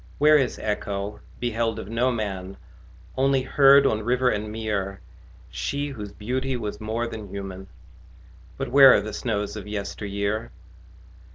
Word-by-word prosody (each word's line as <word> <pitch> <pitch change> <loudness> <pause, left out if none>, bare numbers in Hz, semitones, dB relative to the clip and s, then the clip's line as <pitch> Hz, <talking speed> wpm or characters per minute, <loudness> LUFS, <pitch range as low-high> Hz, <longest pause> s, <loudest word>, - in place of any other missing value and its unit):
Where 150 0 +6
is 130 -3 -1
Echo, 105 -1 -3 0.2
beheld 115 -2 -1
of 110 - -6
no 120 +4 +1
man, 100 -4 -4 0.6
Only 135 0 +2
heard 140 +1 +6
on 110 -5 +1
river 125 +3 +2
and 105 -1 -2
mere 105 -3 -3 0.5
She 145 +1 -2
whose 105 -7 -7
beauty 130 +5 -2
was 105 -2 -5
more 110 +2 -2
than 110 -3 -7
human? 95 -1 -7 0.9
But 135 -2 -3
where 135 -1 +9
are - - +2
the 105 +1 -6
snows 105 -4 -2
of 105 -2 -7
yesteryear? 100 +1 -3
110 Hz, 145 wpm, -25 LUFS, 105-130 Hz, 0.9 s, where